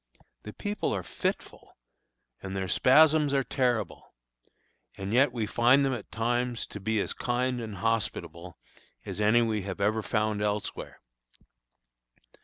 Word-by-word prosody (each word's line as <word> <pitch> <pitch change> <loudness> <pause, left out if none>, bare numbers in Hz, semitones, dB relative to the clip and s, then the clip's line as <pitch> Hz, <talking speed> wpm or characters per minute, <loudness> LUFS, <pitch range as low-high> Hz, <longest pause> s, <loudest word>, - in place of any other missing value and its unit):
The 105 - -8
people 205 +1 -3
are - - -3
fitful, - - -5 0.6
and 95 0 -6
their 95 -1 -2
spasms 150 - +4
are 135 - +2
terrible; 120 -7 -2 0.8
and 95 +2 -4
yet 130 +2 +4
we 115 -3 -2
find 120 +6 +4
them 135 - 0
at 125 - -7
times 120 +1 -1
to 105 - -6
be 110 +2 -1
as - - -1
kind 125 0 -1
and 110 -3 -6
hospitable 95 -4 -3 0.5
as - - -5
any 115 +3 +4
we 110 -2 -1
have 95 0 -6
ever 105 +2 +1
found 105 -1 -1
elsewhere. 105 0 -3
115 Hz, 140 wpm, -28 LUFS, 105-125 Hz, 0.8 s, spasms